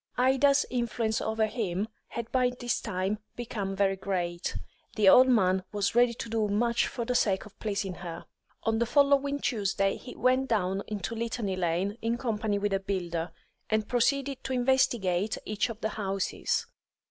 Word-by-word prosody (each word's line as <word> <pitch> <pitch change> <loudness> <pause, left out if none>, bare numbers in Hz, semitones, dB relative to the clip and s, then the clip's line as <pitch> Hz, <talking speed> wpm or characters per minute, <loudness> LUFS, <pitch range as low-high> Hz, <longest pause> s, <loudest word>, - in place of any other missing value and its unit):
Ida's 270 +3 +4
influence 235 -2 -1
over 220 0 +1
him 210 -3 -2 0.2
had 235 0 -6
by 255 -1 +3
this 240 -1 -1
time 195 +1 -2 0.2
become 205 -5 -4
very 195 0 +2
great; 180 -3 -2 0.4
the 210 -3 +3
old 255 +7 +8
man 190 -6 +3
was 205 -1 0
ready 240 0 +4
to 230 - -6
do 220 -1 0
much 235 +3 +1
for 235 - -4
the 250 - 0
sake 200 -5 +1
of 205 -1 -16
pleasing 200 -3 -2
her. 170 -2 -7 0.4
On 225 0 +1
the 235 - +1
following 280 +1 +3
Tuesday 195 -5 0
he 250 - -10
went 255 +1 +2
down 195 -4 0
into 210 +1 -4
Litany 225 -3 -2
Lane 185 +4 -1
in 230 +1 0
company 220 -4 -1
with 205 0 -1
a 195 - +2
builder, 175 -4 -3 0.4
and 215 -1 +1
proceeded 270 +2 +1
to 265 - -3
investigate 235 -7 +2
each 215 +3 -1
of 230 0 -7
the 220 - 0
houses. 195 -3 -1
220 Hz, 170 wpm, -29 LUFS, 195-245 Hz, 0.4 s, old